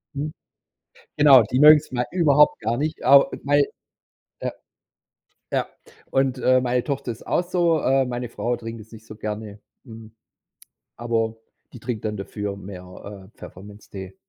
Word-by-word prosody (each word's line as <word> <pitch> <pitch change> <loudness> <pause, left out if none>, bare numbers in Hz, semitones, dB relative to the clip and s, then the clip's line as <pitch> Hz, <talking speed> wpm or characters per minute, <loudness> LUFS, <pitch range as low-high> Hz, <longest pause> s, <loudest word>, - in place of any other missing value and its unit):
Mhm. 150 +2 -4 0.8
Genau, 140 -4 +8
die 125 +5 -2
mögen's 150 0 +7
mal 125 -1 -1
überhaupt 150 -5 +4
gar 115 +2 -2
nicht. 155 +3 -3
A 140 +2 +7 0.2
weil 145 0 +3 0.8
Ja. - - -3 1.0
Ja. - - 0 0.4
Und, 135 -1 +1
äh, 130 0 +3
meine 125 -1 0
Tochter 140 -4 -3
ist 115 - -11
auch - - +1
so. 175 -3 +1
Äh, 135 0 +2
meine 125 -1 -4
Frau 120 +1 -2
trinkt 115 -1 -8
das 110 +2 -17
nicht 110 -1 -13
so 110 - -11
gerne. 105 -1 -6 0.3
Hm, 110 -1 -12 0.8
aber 115 -1 -2 0.4
die 120 - -10
trinkt 115 -3 -5
dann 105 -1 -2
dafür 100 0 -5
mehr, 95 +1 -11
äh, - - -34
Pfefferminztee. 95 -1 -11
120 Hz, 150 wpm, -23 LUFS, 105-140 Hz, 1.0 s, Genau